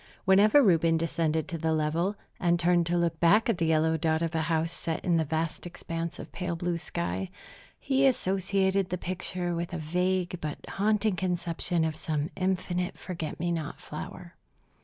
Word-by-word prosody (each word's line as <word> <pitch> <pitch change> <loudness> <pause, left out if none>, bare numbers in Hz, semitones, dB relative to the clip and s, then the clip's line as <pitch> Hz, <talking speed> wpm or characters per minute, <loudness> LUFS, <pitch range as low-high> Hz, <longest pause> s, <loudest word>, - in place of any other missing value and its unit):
Whenever 210 +9 +6
Reuben 165 -5 +4
descended 160 -1 0
to 170 -3 -4
the 160 0 +1
level, 160 +6 0 0.2
and 175 -1 +2
turned 175 0 +3
to 175 +1 +1
look 170 -2 0
back 205 +8 +5
at 220 -6 +1
the 165 - +1
yellow 160 0 +3
dot 160 +1 +1
of 165 - -2
a 160 - +1
house 165 +1 0
set 165 -1 -4
in 175 -2 +3
the 160 - +2
vast 160 +3 -2
expanse 165 -1 -5
of - - -9
pale 180 -2 -3
blue 175 0 -2
sky, 90 - -3 0.5
he 270 0 +3
associated 195 -4 +1
the 180 - -1
picture 180 0 -3
with 170 +1 -3
a - - -2
vague 180 +2 -1
but 150 -2 -3
haunting 210 0 +1
conception 175 -1 -1
of 160 -1 -2
some 155 -1 -2
infinite 180 -1 -1
forget 170 -4 -5
me 175 +1 0
not 160 -3 -3
flower. 170 +3 -8
170 Hz, 180 wpm, -28 LUFS, 160-185 Hz, 0.5 s, Whenever